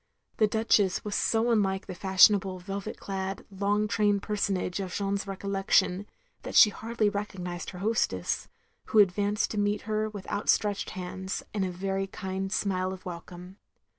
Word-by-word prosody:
The 215 - +4
Duchess 210 -3 +2
was 210 - -3
so 225 +3 +2
unlike 195 -4 +1
the - - -6
fashionable 190 +1 +4
velvet 195 +2 -6
clad 195 0 -4
long 205 +2 0
trained 205 -1 +1
personage 200 -3 -1
of 190 -2 -4
Jeanne's 200 +1 -2
recollection, 195 0 +1 0.3
that - - -7
she 210 - +8
hardly 225 0 -1
recognised 190 -4 -4
her 180 - -9
hostess, 190 - 0 0.4
who - - -1
advanced 205 +1 +3
to 210 - -2
meet 205 0 +1
her 215 0 -1
with 205 -3 -8
out 205 - -3
stretched 205 -1 +2
hands, 185 +1 -4
and 205 -2 0
a 185 - -1
very 195 +2 -2
kiad 190 0 -4
smile 185 -3 0
of 190 -1 -9
welcome. 180 +1 -9
195 Hz, 160 wpm, -28 LUFS, 190-210 Hz, 0.4 s, she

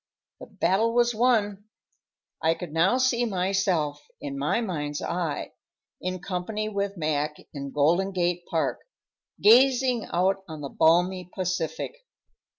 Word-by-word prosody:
The - - -10
battle 225 +5 +1
was 240 0 +3
won. 215 -4 +1 0.8
I 160 +1 +2
could 170 -3 -8
now 180 +9 +3
see 255 -2 +2
myself, 185 -7 0 0.2
in 140 -1 -5
my 145 +10 0
mind's 150 -9 -3
eye, 170 -3 -3 0.5
in 185 0 -2
company 200 +5 -3
with 200 -1 -3
Mac 150 -1 -1 0.2
in 140 -2 -5
Golden 170 +8 +2
Gate 175 -1 0
Park, 165 -3 0 0.6
gazing 250 +1 +5
out 185 +2 +2
on 155 -2 -8
the 140 - -5
balmy 180 +4 +2
Pacific. 185 - -2
185 Hz, 130 wpm, -26 LUFS, 160-215 Hz, 0.8 s, gazing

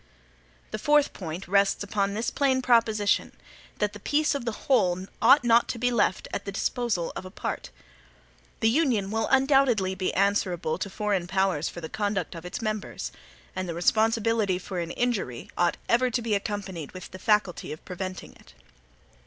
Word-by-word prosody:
The 215 - -3
fourth 295 +3 +3
point 175 0 -6
rests 200 +1 +2
on 200 0 +1
this 225 +2 -1
plain 260 -2 +1
proposition, 220 -4 +2 0.4
that 210 0 0
the 205 - -9
peace 300 +8 +1
of 280 -4 -3
the 230 - 0
WHOLE 185 -8 +2 0.2
ought 270 +5 +7
not 235 0 +4
to - - -3
be 245 +1 +1
left 205 -5 +1
at - - -2
the 200 - -5
disposal 200 -3 -1
of - - -5
a 185 - -8
PART. - - -5 0.9
The 225 - +4
Union 235 -9 +1
will 225 0 0
undoubtedly 265 -8 +3
be 185 0 -1
answerable 185 -4 +1
to 200 - -3
foreign 195 -3 -1
powers 190 -5 +1
for 175 - -8
the 160 - -5
conduct 200 -2 -2
of 165 0 -9
its 200 - -5
members. 215 -1 -3 0.4
And 185 -1 -3
the 165 - -3
responsibility 220 +1 +2
for 185 0 -5
an 170 -1 -3
injury 200 - -2
ought 175 0 +1
ever 250 +2 +3
to 245 0 -1
be 225 -2 -1
accompanied 200 -6 -3
with 185 -1 -9
the 185 - -9
faculty 210 -3 +1
of 155 - -9
preventing 185 0 -6
it. - - -20
205 Hz, 180 wpm, -27 LUFS, 185-235 Hz, 0.9 s, ought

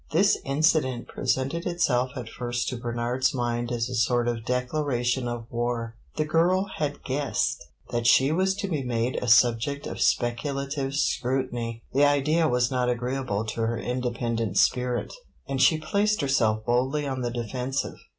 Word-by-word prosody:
This 195 +6 +3
incident 140 -3 +1
presented 135 +6 -1
itself 130 -8 +1
at 125 -4 -5
first 120 +1 -3
to 125 - -4
Bernard's 120 +2 -1
mind 120 -1 -1
as 115 -1 -1
a 130 - -6
sort 120 +1 +2
of 115 -2 -2
declaration 125 -1 0
of 120 -1 -4
war. 120 -1 -2 0.2
The 155 - 0
girl 180 +5 +2
had 145 -2 -3
guessed 130 -2 -1 0.3
that 120 -1 0
she 135 +4 +5
was 190 +3 +2
to 200 0 -3
be 155 -7 -1
made 125 0 -1
a 125 - -3
subject 120 +4 +3
of - - -5
speculative 140 +3 0
scrutiny. 120 -4 -1
The 140 +2 +5
idea 150 +3 +3
was 125 -1 +1
not 125 -1 +1
agreeable 125 -3 -2
to 115 +1 -4
her 115 +1 0
independent 120 -3 -2
spirit, 125 -1 +1 0.3
and 135 -1 -1
she 160 - +5
placed 205 +6 +1
herself 110 -6 +1
boldly 130 +5 +1
on 135 -2 -3
the 120 - -1
defensive. 125 +3 -3
125 Hz, 160 wpm, -26 LUFS, 120-140 Hz, 0.3 s, she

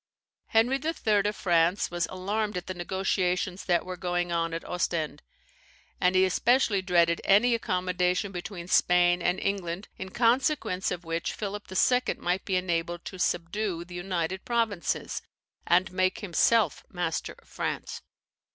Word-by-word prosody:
"Henry 240 +5 +3
III. 215 -11 +1
of 210 - -2
France 175 +1 +2
was 175 -1 -1
alarmed 205 +2 -2
at 180 - -5
the 185 - -4
negotiations 185 0 -1
that 175 -2 +2
were 185 0 -5
going 175 -1 -2
on 165 0 0
at 165 0 -5
Ostend; 160 -4 -2 0.8
and 180 +1 +3
he 185 0 +5
especially 215 +1 +2
dreaded 170 -2 +2
any 225 +5 +5
accommodation 180 -2 0
between 175 -1 -6
Spain 175 0 +4
and 180 +2 +1
England, 190 -1 -3
in 190 - -5
consequence 235 -3 +1
of 180 -1 -5
which 165 +1 -2
Philip 205 -1 -6
II. 250 +6 +2
might 180 +2 -1
be 190 - 0
enabled 175 -1 -1
to 185 - -7
subdue 175 0 -1
the 175 - -12
United 175 0 -3
Provinces, 225 -6 -1 0.5
and 180 +2 +3
make 185 +2 0
himself 210 +3 +2
master 175 -3 -3
of - - -23
France. - - -4
185 Hz, 145 wpm, -28 LUFS, 175-200 Hz, 0.8 s, he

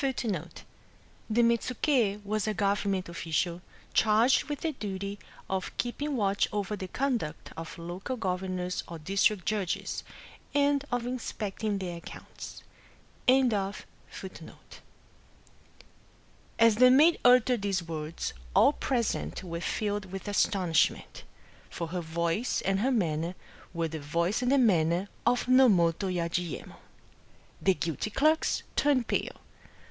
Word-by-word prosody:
^ 220 - -2 0.8
The 235 +2 +3
Mettuki 235 -2 +1
wat 215 +1 -1
a 215 - 0
gOTeroment 200 -2 0
official, 170 +1 -2 0.3
charged 220 +4 +4
with 290 -1 -5
the 325 - 0
duty 200 -5 -5 0.3
of 190 -1 -3
keeping 280 +3 -2
watch 200 -2 +2
over 205 0 -2
the 190 -2 -6
conduct 240 - -2
of 165 +1 -7
local 175 +9 -5
goTemon 185 -3 -2
or 170 - -7
district 195 +3 +1
judges, 205 -4 -2 0.5
and 285 -1 +3
of 245 -1 -1
inspecting 215 -4 -3
their 180 -3 -4
accounts. 170 - -10 0.6
Digitized 260 0 +6
by - - +1
Googk 195 0 -2 0.3
SHIRYO - - -7 0.3
41 - - -23 2.0
As 230 -1 +6
the 255 - +7
m^d 290 +7 +6
uttered 250 -1 +5
these 195 -3 0
words, 160 -1 -4 0.2
all 290 - +6
present 230 - -2
were 170 -2 -5
filled 205 +2 -2
with 190 +2 -7
astonishment; 185 -5 +1 0.5
for 170 -1 -5
her 180 +1 -3
voice 170 +7 -1
and 195 0 +1
her 250 +6 +2
manner 170 -6 0 0.4
were 165 -2 -1
the 160 0 -5
voice 170 +9 0
and 250 +1 +1
the 280 - +5
manner 180 -5 +3 0.2
of 245 0 +2
Nomoto 200 -8 +4
Yajiyemon. 175 -1 -3 0.9
The 190 -1 +3
guilty 165 +5 -2
clerks 310 +8 +2
turned 270 -5 +2
pale. - - -2
200 Hz, 130 wpm, -29 LUFS, 175-240 Hz, 2.0 s, the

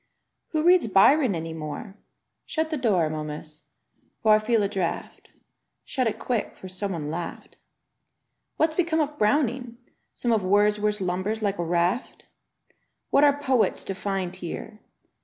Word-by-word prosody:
"Who 310 -1 -1
reads 355 -6 +5
Byron 230 - +5
any 165 0 -4
more?" 155 +6 -6 0.5
Shut 315 0 -1
the - - 0
door, 200 - +2
Momus, 155 0 -6 0.6
for 215 -1 +6
I 215 - +6
feel 220 0 +1
a - - +2
draught; 190 -4 -4
|64i - - -34
•^ - - -36 0.4
Shut 255 -3 0
it 220 0 -2
quick, 235 -2 -2
for 190 - -9
some 185 +1 -3
one 150 -3 -4
laughed. 170 +1 -6 1.0
"What's 315 0 +2
become 330 -1 +1
of 295 -1 -1
Browning? 240 +1 +1 0.4
Some 240 - -1
of 220 -2 +3
Wordsworth 210 +2 +2
lumbers 190 +5 -2
like 200 -2 -1
a - - +1
raft? 175 +8 -1 0.9
"Yi^at 280 - +6
are 285 -1 +5
poets 260 -5 +1
to 195 - -4
find 190 -1 -3
here? 200 +4 -7
210 Hz, 160 wpm, -25 LUFS, 180-250 Hz, 1.0 s, for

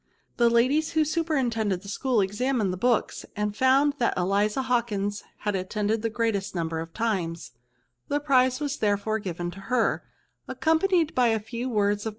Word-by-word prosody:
The 235 -1 +4
ladies 265 +7 +2
who 315 -1 +3
superintended 250 - 0
the - - -11
school 240 +2 0
examined 210 +1 0
the - - -5
books, 240 +3 0
and 210 0 -2
found 270 +4 +4
that 235 - +1
Eliza 205 +7 +1
Hawkins 210 -5 -1 0.2
had 210 -1 -1
attended 210 +3 -1
the 225 - -1
greatest 220 -4 -1
number 165 -1 -2
of 165 0 -6
times; 185 -7 -2 0.6
the 290 - 0
prize 260 -3 +3
was 290 -1 -2
therefore 210 +1 0
given, 175 -3 -4
to 190 - -11
her, 230 +4 0 0.4
accompanied 325 0 +1
by 250 -1 +3
a 225 -1 +2
few 235 +4 -5
words 205 -1 0
of - - 0
225 Hz, 165 wpm, -26 LUFS, 200-260 Hz, 0.6 s, The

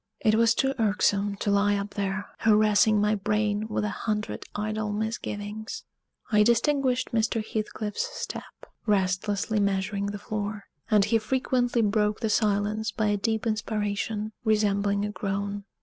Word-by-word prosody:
It 215 -2 +3
was 230 +1 +4
too 270 0 +1
irksome 205 -1 +2
to 205 - +1
lie 205 0 +3
up 200 0 -3
there, 200 0 -2
harassing 215 -1 +4
my 210 +1 +2
brain 210 +1 0
with 215 - -1
a - - -1
hundred 215 -1 -3
idle 215 0 -2
misgivings. 215 - -4 0.5
I 210 -1 +5
distinguished 255 +3 +2
Mr. 225 -1 0
Heathcliff's 215 - -3
step, - - -7 0.2
restlessly 200 +2 +1
measuring 200 0 0
the 205 0 -4
floor; 205 0 -4 0.3
and 210 -2 +5
he 225 +2 +2
frequently 245 0 +1
broke 210 0 +1
the 220 -2 0
silence 210 +1 +1
by 215 0 0
a 205 - +2
deep 220 +2 -1
inspiration, 215 -1 -2
resembling 205 -2 +2
a 210 - -3
groan. 200 +1 -3
210 Hz, 145 wpm, -27 LUFS, 205-220 Hz, 0.5 s, I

